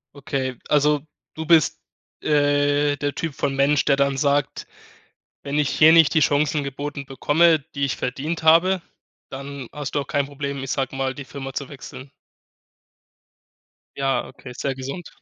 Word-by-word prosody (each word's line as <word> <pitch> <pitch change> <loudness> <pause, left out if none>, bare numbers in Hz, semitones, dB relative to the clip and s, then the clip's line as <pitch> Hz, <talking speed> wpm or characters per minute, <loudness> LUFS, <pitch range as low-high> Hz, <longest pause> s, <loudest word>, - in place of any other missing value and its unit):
Okay, 135 -2 -3
also 150 0 +3 0.3
du 160 - -6
bist, 160 -2 +4 0.4
äh, 145 0 +2
der 145 0 -2
Typ 165 -3 -3
von 135 0 -2
Mensch, 140 +2 +3
der 140 - +4
dann 140 0 +1
sagt: 140 0 0 0.8
„Wenn 140 +1 -2
ich 145 - 0
hier 155 +1 +6
nicht 165 -3 +6
die 160 - +4
Chancen 145 +1 +2
geboten 140 +1 -5
bekomme, 160 +4 +3 0.2
die 140 - +1
ich 135 - -1
verdient 150 +7 -3
habe,“ 170 +3 +4 0.5
dann 140 -1 -7
hast 145 -2 -6
du 145 - +2
auch 140 - -6
kein 140 -1 0
Problem, 140 -1 -5
ich 135 - -3
sage 135 -1 -2
mal, 135 0 -1
die 140 +1 -8
Firma 135 0 -7
zu 135 0 -5
wechseln? 135 -1 -10 1.9
Ja, 135 -1 0
okay, 125 - -12
ist 125 - -8
sehr 135 - -1
gesund. 135 +6 -7
140 Hz, 165 wpm, -22 LUFS, 135-150 Hz, 1.9 s, hier